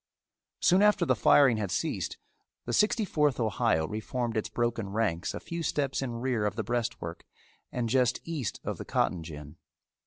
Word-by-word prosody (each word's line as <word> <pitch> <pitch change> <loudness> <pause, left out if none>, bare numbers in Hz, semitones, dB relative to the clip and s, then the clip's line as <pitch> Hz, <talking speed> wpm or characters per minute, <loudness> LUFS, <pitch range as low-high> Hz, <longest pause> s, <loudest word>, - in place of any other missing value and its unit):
Soon 185 +2 +5
after 210 -3 +4
the - - +3
firing 135 -6 +5
had 105 -3 -2
ceased - - -2 0.5
the - - -3
Sixty 215 +1 +3
fourth 150 -7 +1
Ohio 110 -7 +1
reformed 115 +3 -3
its 110 - -1
broken 120 -4 -1
ranks 100 -5 -1
a - - -4
few 170 0 -5
steps 140 -4 -1
in 125 -3 -3
rear 125 -4 0
of - - -3
the 110 - -2
breastwork 110 -7 -3 0.5
and 120 -2 -1
just 125 0 +2
east 150 - -4
of - - -4
the - - -6
cotton 90 - 0
gin. 75 -1 -9
120 Hz, 175 wpm, -29 LUFS, 105-140 Hz, 0.5 s, Soon